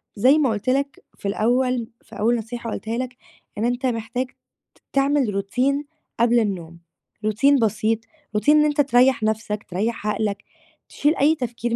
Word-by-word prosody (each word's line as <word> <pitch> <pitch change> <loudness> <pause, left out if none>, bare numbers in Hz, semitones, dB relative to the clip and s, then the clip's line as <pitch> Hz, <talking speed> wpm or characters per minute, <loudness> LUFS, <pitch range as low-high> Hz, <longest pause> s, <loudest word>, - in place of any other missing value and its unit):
زي 255 +8 +5
ما 280 -5 +3
قُلت 215 +2 -2
لك 275 +1 -1
في - - -5
الأول 240 +3 +1
في 225 - -13
أول 235 +3 +3
نصيحة 230 +1 -5
قُلتها 225 +2 -3
لك 250 -1 -4 0.4
إن 215 - 0
أنت 245 +2 -1
محتاج 235 +1 -1 0.5
ت - - -28
تعمل 275 -8 +2
Routine 265 +8 0 0.4
قبل 235 +1 +4
النوم، 175 -6 -3 0.5
Routine 270 +6 +4
بسيط، 220 +1 +1 0.4
Routine 210 +8 +1
إن 300 0 +6
أنت 295 0 +2
تريّح 255 -3 +3
نَفْسك، 215 -1 -1
تريّح 210 +4 -2
عقلك، 210 -1 -1 0.5
تشيل 295 +3 +1
أي 305 +3 +4
تفكير 240 -2 -3
235 Hz, 160 wpm, -22 LUFS, 215-260 Hz, 0.5 s, إن